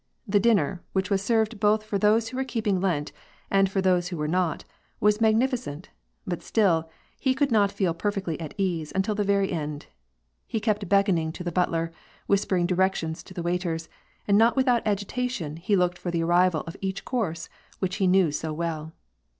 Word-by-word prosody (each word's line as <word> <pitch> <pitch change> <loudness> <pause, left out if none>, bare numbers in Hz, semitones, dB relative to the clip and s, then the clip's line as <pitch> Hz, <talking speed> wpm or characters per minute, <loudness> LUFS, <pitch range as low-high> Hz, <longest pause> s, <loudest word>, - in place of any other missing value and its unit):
The 205 0 +3
dinner, 195 -5 +2
which 190 +1 -1
was 195 -1 +2
served 220 0 +1
both 210 +1 +3
for 210 -2 -2
those 220 +2 +3
who 255 - -7
were 265 - +1
keeping 220 -7 -1
Lent 160 -6 0 0.4
and 195 -1 +4
for 195 0 0
those 180 -2 +2
who 180 -2 -5
were 150 0 -1
not, 175 -1 0 0.3
was 210 +1 +3
magniiicenty 220 - 0 0.4
bat 175 -2 -3
still, 170 -7 +2 0.3
he 260 -1 +1
could 280 -1 +1
not 205 -3 +4
feel 185 -5 0
per 205 +5 -1
fectly 190 -6 -3
at 155 - -7
ease 175 -6 -1
until 195 +3 +1
the 205 0 0
very 200 -1 +1
end. 150 -4 -4 0.6
He 225 - -2
kept 210 -2 -1
beckoning 195 -5 +2
to 180 - -7
the 175 - -3
butler, 165 -1 0 0.3
whispering 195 -3 +1
directions 180 -3 0
to - - -13
the 175 - -4
waiters, 170 -2 -2 0.4
and 200 0 +5
not 230 +1 +4
without 255 -3 +3
agitation, 205 - -2
looked 180 -3 +2
for'the 170 -2 -1
arrival 175 -1 +3
of 165 - -8
each 190 0 -3
course 175 -10 -2 0.3
which 185 -1 -2
he 190 - +2
knew 180 -3 +4
so 155 +2 -3
well. 160 0 -4
190 Hz, 185 wpm, -26 LUFS, 170-210 Hz, 0.6 s, and